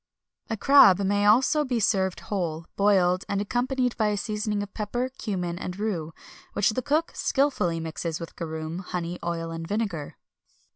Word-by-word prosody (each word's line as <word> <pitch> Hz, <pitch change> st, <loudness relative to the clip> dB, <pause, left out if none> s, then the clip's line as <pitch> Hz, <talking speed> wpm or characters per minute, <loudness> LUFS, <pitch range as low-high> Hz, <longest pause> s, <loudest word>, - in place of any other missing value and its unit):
A 225 Hz, -, -2 dB
crab 210 Hz, -6 st, +7 dB
may 205 Hz, +1 st, +2 dB
also 265 Hz, +8 st, +4 dB
be 250 Hz, -4 st, -1 dB
served 190 Hz, -3 st, +1 dB
whole, 170 Hz, -5 st, -3 dB
boiled, 190 Hz, -2 st, +3 dB
and 200 Hz, -, 0 dB
accompanied 245 Hz, +4 st, 0 dB
by 215 Hz, -, +2 dB
a 210 Hz, -1 st, 0 dB
seasoning 210 Hz, 0 st, -2 dB
of 205 Hz, -, -10 dB
pepper, 240 Hz, +4 st, -2 dB
cummin, 180 Hz, -5 st, -2 dB
and 180 Hz, 0 st, -5 dB
rue, 185 Hz, -7 st, -2 dB, 0.4 s
which 205 Hz, -, +2 dB
the 255 Hz, -, -2 dB
cook 305 Hz, +6 st, 0 dB
skilfully 265 Hz, -12 st, +1 dB
mixes 165 Hz, 0 st, -4 dB
with 165 Hz, -, -8 dB
garum, 160 Hz, 0 st, -5 dB
honey, 180 Hz, -1 st, -4 dB
oil, 165 Hz, -1 st, -3 dB
and 165 Hz, 0 st, -5 dB
vinegar. 200 Hz, -8 st, -3 dB
200 Hz, 160 wpm, -26 LUFS, 170-225 Hz, 0.4 s, crab